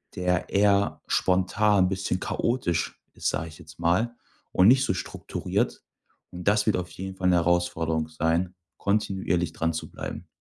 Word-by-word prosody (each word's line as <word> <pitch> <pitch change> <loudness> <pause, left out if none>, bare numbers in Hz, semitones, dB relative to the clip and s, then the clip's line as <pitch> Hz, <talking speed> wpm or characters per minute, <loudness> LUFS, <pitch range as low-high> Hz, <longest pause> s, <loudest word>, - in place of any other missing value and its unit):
der 90 0 0
eher 100 0 +2
spontan 95 +1 +3
'n - - +1
bisschen 95 -1 -1
chaotisch 105 -4 -1
ist, - - -1
sage 80 +1 -2
ich 80 - -12
jetzt 80 -1 -14
mal 100 +8 +1 0.4
und 95 - +5
nicht 130 +2 +6
so - - +1
strukturiert. 95 - -3 0.5
Und 90 +2 -8
das 105 0 +4
wird 110 - +3
auf 90 0 -4
jeden 95 0 -6
Fall 95 -1 -1
'ne 90 - +4
Herausforderung 85 -2 +1
sein, 80 +3 0 0.2
kontinuierlich 95 -5 0
dranzubleiben. 80 -1 -4
90 Hz, 150 wpm, -26 LUFS, 85-100 Hz, 0.5 s, nicht